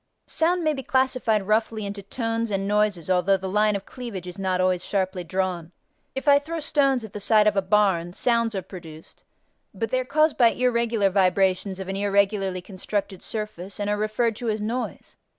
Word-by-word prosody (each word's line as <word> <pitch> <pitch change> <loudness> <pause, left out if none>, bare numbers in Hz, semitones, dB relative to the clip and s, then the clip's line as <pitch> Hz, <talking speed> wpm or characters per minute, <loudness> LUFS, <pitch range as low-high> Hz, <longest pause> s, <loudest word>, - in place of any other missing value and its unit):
Sound 345 +2 +1
may 310 -1 +2
be 270 - -4
classified 255 -5 +1
roughly 220 0 0
into 200 0 -5
tones 225 +2 -2
and 195 -1 -1
noises 205 -5 +1
although 185 +1 +3
the 190 0 -5
line 210 +2 +2
of 200 - -4
cleavage 235 -8 -7
is 180 +2 -8
not 185 -1 0
always 185 -1 +1
sharply 185 -2 -1
drawn. 180 -2 -2 0.4
If 265 +2 -5
I 285 0 +7
throw 325 +3 -5
stones 275 -5 +1
at 215 - -12
the 210 - -5
side 210 +1 +4
of 210 -1 +3
a 195 - +3
barn, 185 -3 +2
sounds 230 0 +1
are 190 - -2
produced, 165 -4 -12 0.5
but 225 +3 -3
they 255 - +2
are - - -1
caused 305 +3 +2
by 235 -2 +6
irregular 235 -5 +1
vibrations 190 0 +2
of 190 - -6
an 195 0 -3
irregularly 200 -2 +1
constructed 195 0 -4
surface 210 -3 -6
and 205 0 -1
are - - +2
referred 215 +2 0
to 240 - -3
as 215 0 -1
noise. 230 +4 -4
210 Hz, 195 wpm, -24 LUFS, 190-230 Hz, 0.5 s, I